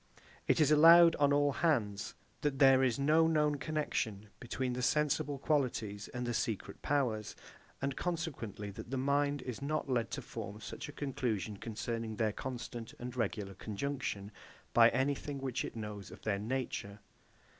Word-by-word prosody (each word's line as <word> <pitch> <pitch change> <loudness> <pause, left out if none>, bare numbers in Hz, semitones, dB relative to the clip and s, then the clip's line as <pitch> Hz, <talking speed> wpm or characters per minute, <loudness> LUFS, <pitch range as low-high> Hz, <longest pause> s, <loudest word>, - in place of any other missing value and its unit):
It - - +3
is 150 -1 +4
allowed 165 +2 +8
on 145 -1 +4
all 145 0 +3
hands 115 -10 0 0.3
that 145 -2 0
there 135 -1 +6
is 125 -3 +2
no 155 +4 +4
known 150 -2 +2
connexion 130 -8 -2
between 125 +1 -2
the 125 - -3
sensible 150 +1 +1
qualities 120 -8 -1
and 125 0 -4
the 120 - -1
secret 110 -2 -3
powers; 120 -7 0 0.5
and 135 -1 -1
consequently, 140 - -4
that 100 - -9
the 135 - -2
mind 140 +1 +1
is 125 0 -5
not 145 -1 -2
led 120 -3 +1
to - - -5
form 105 +1 -7
such 115 - -7
a - - -6
conclusion 115 -8 -2
concerning 115 +1 -4
their 110 -1 0
constant 120 -2 -6
and 125 0 -6
regular 105 -4 -2
conjunction, 105 0 -4 0.4
by 115 0 +8
anything 140 +3 -1
which 135 -2 -2
it - - -6
knows 105 -3 -6
of 95 +1 -13
their 100 -2 0
nature. 110 -3 -3
130 Hz, 160 wpm, -33 LUFS, 110-145 Hz, 0.5 s, allowed